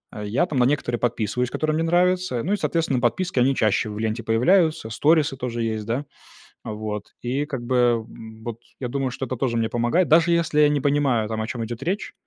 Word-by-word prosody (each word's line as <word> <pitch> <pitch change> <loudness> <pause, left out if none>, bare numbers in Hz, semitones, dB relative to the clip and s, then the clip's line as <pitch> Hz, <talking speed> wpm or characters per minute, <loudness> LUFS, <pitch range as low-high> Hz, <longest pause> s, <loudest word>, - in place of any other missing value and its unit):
Э, 105 - -5
я 120 +12 +1
там 145 -6 -2
на 125 - +5
некоторые 125 -3 0
подписываюсь, 120 +1 -1
которые 155 +3 -1
мне 160 +1 0
нравятся. 180 -5 +1
Ну 190 - 0
и, - - +1
соответственно, 165 -9 0
подписки 125 +6 0
они 135 +2 +3
чаще 110 -1 +1
в 105 - -6
ленте 110 +1 -2
появляются, 155 - +2
сторисы 150 +4 +2
тоже 120 -2 -3
есть, 110 -2 -2
да. 125 +6 -2 0.6
Вот, 105 -1 -6
и 130 +4 -1
как 135 -5 -5
бы 120 -2 +2 0.4
вот 115 -1 -6 0.2
я 125 - -3
думаю, 135 +1 -1
что 130 +2 -4
это 130 - -4
тоже 120 -1 0
мне 115 -1 0
помогает, 120 +10 +1
даже 165 +2 +5
если 165 -3 +1
я 150 - +6
не 145 -2 0
понимаю, 140 -6 +1
там, 110 0 -3
о 110 - -3
чём 115 -1 -4
идёт 115 +1 -7
речь, 195 +4 -3
125 Hz, 215 wpm, -23 LUFS, 115-155 Hz, 0.6 s, я